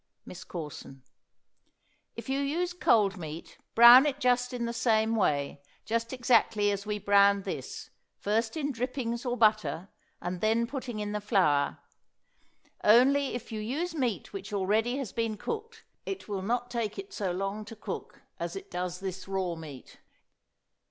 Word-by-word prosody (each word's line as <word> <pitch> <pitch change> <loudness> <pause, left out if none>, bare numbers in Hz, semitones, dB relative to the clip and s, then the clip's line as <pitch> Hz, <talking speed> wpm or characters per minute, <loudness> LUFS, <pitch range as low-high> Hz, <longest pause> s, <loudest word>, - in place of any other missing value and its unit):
MISS 180 - -9
CORSON. 150 -5 -8 1.1
If - - -8
you 270 +1 0
use 335 +6 -1
cold 210 - +3
meat, 160 -1 -8 0.2
brown 240 +4 +10
it 280 -1 -2
just 245 -2 +2
in 245 -2 -3
the 235 - -3
same 225 -1 +2
way, 145 -8 0 0.2
just 230 +2 -1
exactly 230 -5 +3
as 200 +1 -4
we 210 0 -1
browned 200 0 +4
this, - - -6 0.3
first 225 +6 -1
in 290 -2 -1
drippings 245 -1 -3
or 245 0 -1
butter 215 -5 +2 0.3
and 180 0 -4
then 225 +2 +2
putting 255 -2 -5
in 210 -1 -3
the 210 0 -3
flour; 180 -9 +2 1.1
only 265 +6 +5
if 245 0 -7
you 220 - -4
use 295 +11 -3
meat 255 - -2
which 395 - -7
already 215 +5 +1
has 270 -7 -4
been 225 -2 -1
cooked, 455 - -6 0.2
it 390 -1 -6
will 200 -3 -3
not 245 +4 -2
take 230 -4 -2
it 390 0 -8
so 195 -4 -2
long 195 +4 -3
to 225 - -10
cook 220 - -7 0.2
as - - -4
it 390 0 -8
does 180 0 -4
this 190 -1 -5
raw 190 -2 -1
meat. 155 -5 -11
225 Hz, 160 wpm, -29 LUFS, 195-250 Hz, 1.1 s, brown